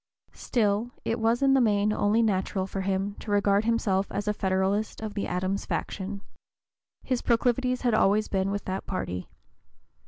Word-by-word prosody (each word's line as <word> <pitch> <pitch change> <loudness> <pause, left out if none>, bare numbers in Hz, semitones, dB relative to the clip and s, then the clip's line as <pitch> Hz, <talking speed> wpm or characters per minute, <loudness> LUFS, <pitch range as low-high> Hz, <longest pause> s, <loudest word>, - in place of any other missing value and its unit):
Still 215 0 0 0.2
it 230 +1 -1
was 230 +3 +2
in 270 0 +5
the 270 - +5
main 210 -2 +2
only 215 +2 +2
natural 190 -2 0
for 195 0 -4
him 195 +1 -1
to - - -9
regard 205 0 +3
himself 205 -4 +1
as 205 - -3
a 210 - +2
Federalist 195 +2 0
of 220 -1 -5
the 205 - -2
Adams 185 +2 -2
faction. 200 0 -3 0.8
His 255 -2 -1
proclivities 250 +1 +1
had 245 -3 +1
always 215 0 +3
been 190 0 0
with 200 +1 -3
that 190 +1 -4
party. 90 - -4
205 Hz, 165 wpm, -27 LUFS, 195-225 Hz, 0.8 s, in